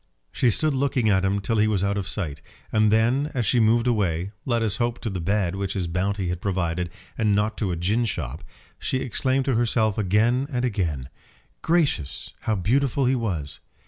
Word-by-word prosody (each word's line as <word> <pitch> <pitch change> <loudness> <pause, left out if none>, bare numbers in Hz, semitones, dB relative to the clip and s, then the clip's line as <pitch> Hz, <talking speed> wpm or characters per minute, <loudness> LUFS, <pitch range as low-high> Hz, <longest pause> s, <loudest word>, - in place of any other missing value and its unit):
She 125 - +2
stood 155 +6 +2
looking 130 -4 +1
at 95 -1 +2
him 95 +1 +1
till 110 +2 0
he 110 - +4
was 100 -3 +1
out 100 0 +1
of 100 -2 -3
sight, 75 -8 -2 0.3
and 110 -1 +3
then 120 +7 +2
as 120 -3 0
she 120 +5 +3
moved 115 +1 +3
away, 100 -6 0
let 120 -3 +1
us 105 -3 0
hope 120 0 0
to 110 - -3
the 95 - -3
bed 95 0 0
which 100 0 -2
his 95 -3 -1
bounty 90 +2 -1
had 90 0 -3
provided, 90 -3 -1 0.3
and 105 -2 +3
not 105 +1 0
to 100 -5 0
a - - -1
gin 105 +8 +1
shop, 70 - -4 0.4
she 130 - -1
exclaimed 130 +1 0
to 135 - +1
herself 110 -2 +1
again 115 +7 +2
and 125 -1 0
again 80 - -2 0.5
"Gracious, 150 - 0
how 110 - -1
beautiful 130 +7 +1
he 130 - +3
was!" 80 - -3
105 Hz, 200 wpm, -24 LUFS, 95-120 Hz, 0.5 s, he